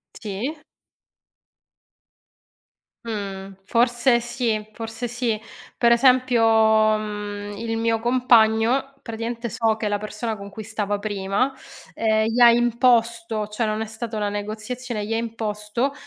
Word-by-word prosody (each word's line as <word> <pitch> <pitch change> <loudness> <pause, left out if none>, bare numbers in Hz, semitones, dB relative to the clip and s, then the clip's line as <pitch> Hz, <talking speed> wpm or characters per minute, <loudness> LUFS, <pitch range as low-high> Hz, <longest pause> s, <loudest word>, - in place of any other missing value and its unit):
Sì. 225 +9 -5 2.5
Mhmm, 195 -3 -5
forse 240 +2 +3
sì, 235 -3 -2
forse 225 +2 -5
sì. 235 -2 -2 0.4
Per 235 -1 +4
esempio, 250 -1 +4 0.6
mhmm, 205 -1 -6
il 225 0 -3
mio 225 0 0
compagno 240 +1 +3
praticamente 230 +1 -4
so 225 0 0
che 215 -1 -2
la 205 - 0
persona 215 +2 -4
con 200 0 -9
cui 220 +2 -8
stava 205 -1 -2
prima, 205 +5 -1 0.4
ehm, 220 -1 +2
gli 230 +2 0
ha 240 - +9
imposto, 235 -2 +2
cioè 210 +2 -2
non 215 0 -1
è 220 - -2
stata 220 +1 -5
una 205 -1 0
negoziazione, 215 +2 -4
gli 225 - -2
ha - - +1
imposto 225 +2 -2
225 Hz, 125 wpm, -23 LUFS, 210-240 Hz, 2.5 s, ha